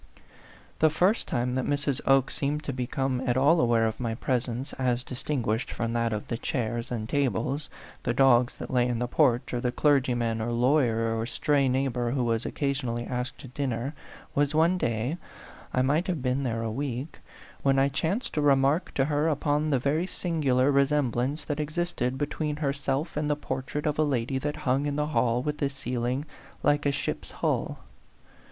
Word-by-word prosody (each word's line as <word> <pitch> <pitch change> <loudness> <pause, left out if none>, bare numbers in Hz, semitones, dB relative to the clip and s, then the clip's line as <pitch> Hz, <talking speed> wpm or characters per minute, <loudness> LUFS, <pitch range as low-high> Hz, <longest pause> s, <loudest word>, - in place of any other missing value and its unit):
The 155 - +5
first 180 +8 +2
time 125 +1 -1
that 130 0 0
Mrs. 145 -2 0
Oke 135 -1 +4
seemed 150 +2 -1
to 140 - -3
be 125 -1 -3
come 135 -1 -1
at 120 0 +2
all 145 +6 +5
aware 115 -2 +3
of 110 0 -2
my 115 -3 -2
presence 125 +2 -2
as 125 -1 +1
distin 130 +1 -3
guished 110 +4 -1
from 115 0 -2
that 115 -1 +1
of 105 -1 -3
the 115 - -3
chairs 120 -2 -2
and 110 -3 -3
tables, 140 +2 -1 0.3
the - - 0
dogs 125 -1 +4
that - - -7
lay 125 -1 +3
in 120 -1 -1
the 125 +1 -1
porch, 125 -3 +2
or 120 - -1
the 125 - 0
clergy 135 -2 +3
man 115 -2 -1
or 120 +2 -2
lawyer 120 -3 +2
or 115 +1 -2
stray 140 +1 +2
neighbor 125 -2 0
who 125 +1 0
was 115 -2 0
occasionally 130 -4 -2
asked 125 +2 -3
to - - -9
dinner, 130 0 -2 0.4
was 145 +1 +1
one 170 +4 +3
day 120 +6 -1 0.5
I 130 - +2
might 150 +7 +1
have 170 -8 -2
been 130 +1 +1
there 115 -4 -1
a 115 - -2
week 135 +3 -4 0.4
when 135 -1 +3
I 135 +1 +4
chanced 165 - -1
to 150 - 0
remark 140 +4 +3
to 135 - +3
her 150 +1 +1
upon 150 0 +1
the 140 - +3
very 150 +7 0
sin 170 -4 -3
gular 130 0 +3
resemblance 140 0 +1
that 145 -1 -3
existed 150 -4 -1
between 150 +1 -2
her 145 -2 -1
self 140 +3 -2
and 150 0 -1
the 150 - +2
portrait 135 0 -4
of 150 0 0
a - - +5
lady 130 -2 0
that 150 +2 -2
hung 135 +3 +2
in 145 - -1
the 150 +1 -1
hall 120 0 +2
with 150 +1 -2
the 140 - +1
ceiling 125 0 -2 0.4
like 145 0 +3
a - - +3
ship's 140 +1 -3
hull. - - -2
135 Hz, 200 wpm, -27 LUFS, 120-145 Hz, 0.5 s, The